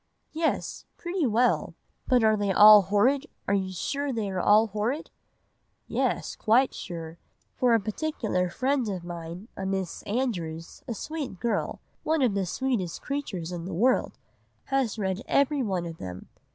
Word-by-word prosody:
"'Yes, 320 0 -2
pretty 345 -4 -1
well; 240 +3 +2 0.3
but 250 -3 +4
are 220 0 +5
they 205 -2 0
all 210 +2 +9
horrid, 240 - +2 0.2
are 200 - +2
you 190 -1 0
sure 280 +10 -2
they 220 -5 -2
are 185 - -2
all 210 +4 +5
horrid?' 220 +8 -3 0.8
"'Yes, - - -1
quite 245 +4 +3
sure; 165 -2 -7 0.4
for 245 -2 +3
a - - +4
particular 215 - -2
friend 260 +2 0
of 185 -3 -4
mine—a 175 +4 -7
Miss 190 -3 -3
Andrews—a 200 -2 -3
sweet 290 - -5
girl, 225 -1 -1 0.2
one 315 -2 +1
of 240 -5 +3
the 195 -2 -1
sweetest 210 -6 -2
creatures 195 - -4
in 170 -1 -5
the 185 -2 -5
world, 250 +8 +2 0.5
has 270 -5 0
read 190 -1 -1
every 280 0 +2
one 190 -7 -1
of 165 -1 -7
them. 90 0 -8
215 Hz, 150 wpm, -27 LUFS, 185-260 Hz, 0.8 s, all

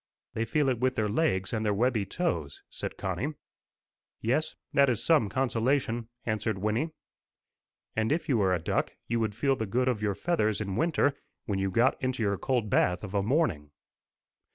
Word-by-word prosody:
"They 115 - -1
feel 140 +5 +1
it 125 -3 +1
with 130 +1 +1
their 110 - +1
legs 100 - +1
and 110 -1 0
their 105 -2 +1
webby 115 -2 +1
toes," 85 - -2
said - - -5
Connie. 100 - -2 0.8
"Yes, 130 +8 0 0.2
that 140 -1 +5
is 115 -3 -1
some 150 -11 +4
consolation," 120 0 0 0.2
answered 110 -1 -1
Wynnie. 110 - 0 1.1
"And 110 +3 +1
if 160 +2 0
you 125 -6 +2
were 95 -2 +3
a 90 - +3
duck, 80 - -1
you 115 0 0
would 110 -2 -1
feel 135 +4 +2
the 110 -5 -3
good 125 +6 +1
of 120 -5 0
your 105 -2 0
feathers 110 - +1
in 100 -3 -3
winter, 155 - +2 0.3
when 100 -6 -1
you 95 0 0
got 115 +7 +2
into 130 -3 -1
your 100 -2 0
cold 125 -5 0
bath 90 -2 +2
of 100 -2 -6
a 100 - +2
morning." 105 - +1
115 Hz, 185 wpm, -29 LUFS, 100-130 Hz, 1.1 s, that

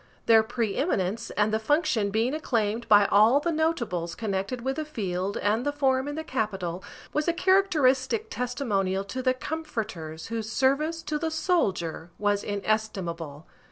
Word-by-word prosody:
Their 225 -1 +7
preeminence 225 - -1
and 210 +1 +2
the 220 - +2
function 235 - +1
being 225 +6 0
acclaimed 230 -6 -1
by 205 -1 +7
all 215 +7 +5
the 335 +4 -1
notables 235 - -1
connected 205 +3 -3
with 265 +3 -2
the 310 - -1
field 195 -9 -3
and 215 +4 +1
the 290 - 0
forum 270 -2 +1
in 290 - -4
the 315 - -4
capital, 195 - -3 0.3
was 300 +2 0
a 340 - +3
characteristic 370 - +2
testimonial 205 -7 -1
to 230 +6 -5
the 255 0 +2
comforters 220 - -5
whose 225 -1 -3
service 300 +6 +1
to 300 -1 -2
the 325 - -1
soldier 200 - -1
was 205 0 +1
inestimable. 190 -7 -3
230 Hz, 155 wpm, -27 LUFS, 200-290 Hz, 0.3 s, Their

